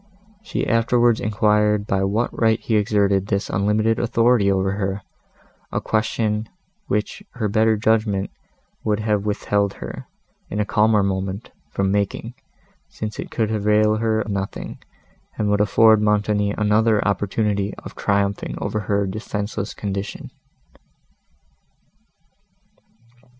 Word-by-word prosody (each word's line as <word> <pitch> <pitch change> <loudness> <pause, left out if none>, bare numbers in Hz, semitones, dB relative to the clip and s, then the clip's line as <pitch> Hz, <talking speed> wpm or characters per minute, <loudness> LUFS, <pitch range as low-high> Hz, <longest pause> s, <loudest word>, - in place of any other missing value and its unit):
She 220 - -3
afterwards 115 0 +3
enquired 105 0 +2
by 95 -2 0
what 105 +5 0
right 110 -1 +2
he 110 - -1
exerted 100 -2 +2
this 100 -2 -1
unlimited 105 +4 +1
authority 115 -3 +3
over 95 0 +1
her, 95 0 -3 0.7
a - - 0
question, 110 0 -1 0.4
which 105 +1 -2
her 110 -3 -1
better 110 +1 +2
judgment 105 -2 +1 0.5
would 105 -1 0
have 105 -1 0
withheld 100 -1 0
her, - - -8 0.4
in 105 - -3
a 105 - +1
calmer 105 0 +3
moment, 95 +2 -3 0.2
from 95 -1 0
making, 100 +3 -1 0.6
since 110 0 -6
it - - -5
could 110 -2 -1
avail 105 0 +2
her 110 -1 +1
nothing, 100 -1 -4 0.6
and 105 -1 0
would 105 0 +2
afford 110 +1 +5
Montoni 105 -1 +1
another 105 0 +2
opportunity 100 +1 0
of - - -10
triumphing 100 0 -1
over 105 - -2
her 100 0 0
defenceless 105 0 -4
condition. 100 -1 -5
105 Hz, 120 wpm, -22 LUFS, 100-110 Hz, 0.7 s, afford